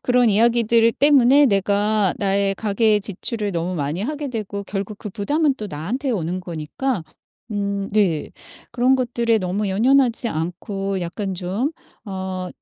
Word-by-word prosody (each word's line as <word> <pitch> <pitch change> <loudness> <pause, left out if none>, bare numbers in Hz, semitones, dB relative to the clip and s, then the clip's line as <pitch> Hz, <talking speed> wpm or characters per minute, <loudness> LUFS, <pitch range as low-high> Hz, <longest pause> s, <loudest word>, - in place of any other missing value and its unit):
그런 245 -2 +3
이야기들 230 +1 +4
때문에 280 0 +5
내가 205 -1 +1
나의 195 0 +1
가계 210 +1 +2
지출을 205 +1 -1
너무 175 +1 -2
많이 150 +2 -2
하게 290 +3 -3
되고 210 -4 -4
결국 200 +1 -4
그 210 - -7
부담은 285 - +1
또 215 - -5
나한테 225 - -3
오는 185 -4 -2
거니까 175 - -3 0.5
음 200 -1 -2
네. 190 -8 +1 0.4
그런 250 +2 +3
것들에 235 -3 +1
너무 195 +2 -2
연연하지 240 +3 +3
않고 190 +4 -3
약간 190 +3 -4
좀 190 - -2 0.4
어 190 -2 -4
205 Hz, 285 characters per minute, -21 LUFS, 190-235 Hz, 0.5 s, 때문에